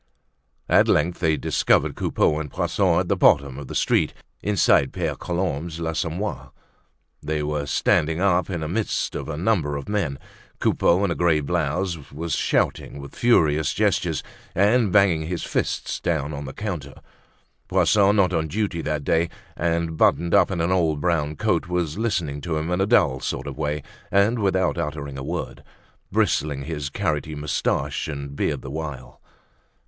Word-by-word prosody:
At -, -, +5 dB
length 85 Hz, +3 st, +2 dB
they 80 Hz, -3 st, +2 dB
discovered -, -, +2 dB
Coupeau 75 Hz, -, +1 dB
and 75 Hz, -2 st, -5 dB
Poisson -, -, +1 dB
at -, -, -4 dB
the -, -, +2 dB
bottom 70 Hz, -1 st, +3 dB
of 70 Hz, -, -8 dB
the -, -, -7 dB
street -, -, +1 dB, 0.3 s
inside 95 Hz, -9 st, +3 dB
Pere -, -, -1 dB
Colombe's 85 Hz, -2 st, -3 dB
l'Assommoir. 85 Hz, +4 st, -3 dB, 0.7 s
They 75 Hz, 0 st, -2 dB
were 75 Hz, -1 st, -2 dB
standing 80 Hz, +3 st, +2 dB
up 90 Hz, -1 st, +2 dB
in 85 Hz, -4 st, -3 dB
the 80 Hz, -, -2 dB
midst 105 Hz, +6 st, -1 dB
of -, -, -5 dB
a 75 Hz, -, -4 dB
number 80 Hz, -6 st, +1 dB
of 70 Hz, -, -7 dB
men; 95 Hz, -10 st, -1 dB, 0.4 s
Coupeau, 90 Hz, +4 st, +3 dB
in 95 Hz, -, -1 dB
a -, -, +2 dB
grey 85 Hz, -3 st, +2 dB
blouse, 80 Hz, +2 st, -2 dB
was 80 Hz, +3 st, -4 dB
shouting -, -, 0 dB
with 70 Hz, 0 st, -10 dB
furious 80 Hz, -, +3 dB
gestures -, -, +1 dB, 0.3 s
and 105 Hz, +2 st, +3 dB
banging 90 Hz, -6 st, +3 dB
his 85 Hz, -1 st, -3 dB
fists -, -, -2 dB
down 75 Hz, -3 st, -1 dB
on 70 Hz, 0 st, -5 dB
the 65 Hz, -, -7 dB
counter. 85 Hz, -10 st, -5 dB, 0.7 s
Poisson, 100 Hz, -1 st, +4 dB
not 95 Hz, -3 st, +3 dB
on 80 Hz, -2 st, 0 dB
duty 95 Hz, -1 st, -2 dB
that 75 Hz, -1 st, -2 dB
day 85 Hz, +3 st, +1 dB, 0.3 s
and 85 Hz, -1 st, -1 dB
buttoned 85 Hz, +2 st, +3 dB
up -, -, +5 dB
in 90 Hz, -4 st, -2 dB
an 85 Hz, +2 st, +1 dB
old 80 Hz, -5 st, +2 dB
brown 75 Hz, -3 st, 0 dB
coat, 105 Hz, -5 st, 0 dB
was 90 Hz, 0 st, -2 dB
listening 85 Hz, -11 st, -1 dB
to 80 Hz, -1 st, -2 dB
him 80 Hz, +3 st, -2 dB
in 90 Hz, +2 st, +1 dB
a 95 Hz, -, +2 dB
dull 85 Hz, -, +3 dB
sort 65 Hz, -, -3 dB
of 70 Hz, -2 st, -6 dB
way 75 Hz, -1 st, -2 dB, 0.3 s
and 100 Hz, +5 st, +3 dB
without 95 Hz, -3 st, +1 dB
uttering 70 Hz, -2 st, -4 dB
a -, -, -5 dB
word, -, -, -5 dB, 0.5 s
bristling 70 Hz, -2 st, +1 dB
his 75 Hz, -2 st, -4 dB
carroty 75 Hz, +1 st, -2 dB
moustaches 75 Hz, 0 st, -1 dB
and 70 Hz, 0 st, -6 dB
beard -, -, -1 dB
the 65 Hz, -, -7 dB
while. 75 Hz, -4 st, -6 dB
80 Hz, 170 wpm, -23 LUFS, 75-90 Hz, 0.7 s, At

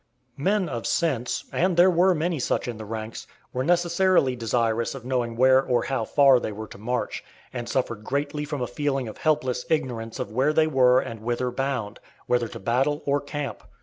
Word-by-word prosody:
Men 190 Hz, +5 st, +1 dB
of 120 Hz, -6 st, -4 dB
sense, 135 Hz, -8 st, 0 dB
and 180 Hz, 0 st, +1 dB
there 180 Hz, +2 st, +7 dB
were 180 Hz, +2 st, +4 dB
many 165 Hz, 0 st, -1 dB
such 125 Hz, -, -1 dB
in 120 Hz, -2 st, -4 dB
the 110 Hz, -, -7 dB
ranks, 110 Hz, +1 st, -6 dB, 0.3 s
were 130 Hz, -, -1 dB
necessarily 175 Hz, -3 st, +3 dB
desirous 115 Hz, 0 st, 0 dB
of 130 Hz, -3 st, -9 dB
knowing 125 Hz, -3 st, -1 dB
where 130 Hz, +2 st, +5 dB
or 125 Hz, -2 st, +1 dB
how 135 Hz, -5 st, -1 dB
far 135 Hz, -1 st, +5 dB
they 110 Hz, -, -4 dB
were 110 Hz, +1 st, -6 dB
to -, -, -12 dB
march, 125 Hz, +4 st, -3 dB, 0.3 s
and 120 Hz, -1 st, -5 dB
suffered 120 Hz, -5 st, -2 dB
greatly 145 Hz, +4 st, -2 dB
from 145 Hz, -3 st, -3 dB
a -, -, 0 dB
feeling 135 Hz, 0 st, -2 dB
of 110 Hz, -, -9 dB
helpless 130 Hz, -5 st, 0 dB
ignorance 120 Hz, -7 st, -2 dB
of 100 Hz, -, -4 dB
where 135 Hz, +7 st, +2 dB
they 155 Hz, 0 st, +4 dB
were 130 Hz, -4 st, +4 dB
and 115 Hz, -, -5 dB
whither 120 Hz, +3 st, -2 dB
bound 125 Hz, -5 st, -3 dB, 0.3 s
whether 120 Hz, -1 st, +1 dB
to -, -, -9 dB
battle 135 Hz, +8 st, 0 dB
or 140 Hz, 0 st, +1 dB
camp. 145 Hz, -4 st, -5 dB
130 Hz, 195 wpm, -25 LUFS, 120-150 Hz, 0.3 s, there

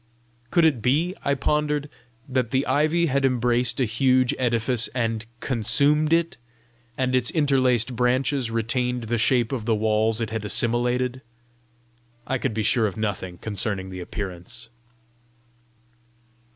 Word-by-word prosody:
Could 170 Hz, +3 st, +3 dB
it 140 Hz, -8 st, +2 dB
be, 150 Hz, +10 st, +1 dB
I 140 Hz, -, +1 dB
pondered, 150 Hz, +1 st, 0 dB, 0.4 s
that 130 Hz, -3 st, 0 dB
the 130 Hz, +3 st, 0 dB
ivy 155 Hz, +4 st, +2 dB
had 140 Hz, -3 st, 0 dB
embraced 125 Hz, -1 st, +1 dB
a 130 Hz, -, +3 dB
huge 130 Hz, +2 st, +2 dB
edifice 120 Hz, -1 st, +1 dB
and 115 Hz, -2 st, -1 dB
consumed 140 Hz, +6 st, +1 dB
it, 165 Hz, 0 st, +1 dB, 0.6 s
and 130 Hz, -1 st, 0 dB
its 125 Hz, -2 st, +2 dB
interlaced 130 Hz, -5 st, +2 dB
branches 125 Hz, +1 st, +1 dB
retained 120 Hz, +2 st, -1 dB
the 115 Hz, +1 st, -1 dB
shapes 120 Hz, +1 st, +2 dB
of 120 Hz, -5 st, -3 dB
the 115 Hz, -1 st, +2 dB
walls 110 Hz, +1 st, +1 dB
it 110 Hz, -2 st, -3 dB
had 110 Hz, -1 st, -3 dB
assimilated? 120 Hz, +3 st, 0 dB, 1.0 s
I 130 Hz, -, -1 dB
could 110 Hz, -, -2 dB
be 110 Hz, -, 0 dB
sure 110 Hz, +1 st, +2 dB
of 100 Hz, -, -6 dB
nothing 95 Hz, -4 st, -3 dB
concerning 100 Hz, -1 st, -3 dB
the 95 Hz, 0 st, -7 dB
appearance. 90 Hz, +2 st, -6 dB
125 Hz, 140 wpm, -24 LUFS, 110-135 Hz, 1.0 s, Could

